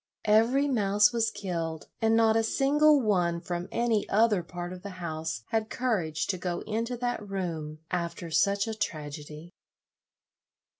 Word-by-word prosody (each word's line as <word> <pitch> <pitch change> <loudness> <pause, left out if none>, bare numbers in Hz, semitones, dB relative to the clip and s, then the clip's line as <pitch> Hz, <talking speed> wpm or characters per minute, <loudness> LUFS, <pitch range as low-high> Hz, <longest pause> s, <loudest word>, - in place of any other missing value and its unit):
Every 230 +7 +4
mouse 210 -3 +3
was 230 -1 +2
killed, 165 -7 -4 0.2
and 225 0 +3
not 225 -1 +4
a 225 - +4
single 290 +6 +4
one 180 -6 +1
from 175 +1 -4
any 230 -3 0
other 215 -2 +3
part 175 +1 -6
of 180 - -9
the 200 - -7
house 160 -6 -4
had 220 -1 0
courage 180 -11 -1
to 185 - -2
go 175 -1 -3
into 230 +3 -3
that 245 -1 -2
room 165 -6 -4
after 170 -1 -3
such 200 +5 +2
a 225 - -2
tragedy. 155 -4 -5
200 Hz, 150 wpm, -28 LUFS, 170-225 Hz, 0.2 s, Every